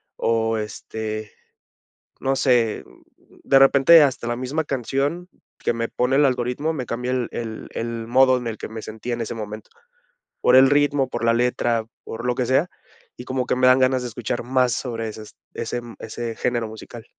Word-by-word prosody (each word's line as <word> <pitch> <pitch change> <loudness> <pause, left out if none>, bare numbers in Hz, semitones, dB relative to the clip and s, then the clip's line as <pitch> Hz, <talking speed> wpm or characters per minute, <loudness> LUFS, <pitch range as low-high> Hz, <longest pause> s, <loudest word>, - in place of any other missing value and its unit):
O 115 0 0
este, 110 0 -5 0.9
no 135 0 0
sé, 120 -5 +2
mm, - - -23
de 135 - +5
repente 140 +4 +7
hasta 130 -4 -1
la 120 - -1
misma 130 +6 -2
canción 140 +6 -2 0.3
que - - 0
me 115 0 -2
pone 125 +2 +1
el 145 - +5
algoritmo, 125 +4 0
me 130 -5 -4
cambia 125 +2 -3
el 125 -2 -1
el 110 -2 -6
el 115 0 -4
modo 130 +1 +5
en 125 - -6
el 110 -1 -4
que - - -5
me 110 0 -7
sentía 110 +3 -5
en 120 - -5
ese 115 - -4
momento. 110 -1 -7 0.7
Por - - +5
el 130 0 +8
ritmo, 145 -1 +2
por - - -4
la 115 0 +4
letra, 120 -1 +1 0.2
por 115 +2 -7
lo 125 - +1
que 125 - 0
sea, 135 +8 +2 0.5
y - - -8
como 130 0 -2
que - - +1
me 130 0 +2
dan 130 +1 +6
ganas 130 0 +2
de 125 - -4
escuchar 120 +1 -4
más 125 0 +2
sobre 115 -2 -3
esas 110 0 -11 0.2
ese, 120 - -3
mm, 120 -1 -11
ese 115 +1 -5
género 120 -1 -1
musical. 110 +1 -10
120 Hz, 195 wpm, -22 LUFS, 115-130 Hz, 0.9 s, el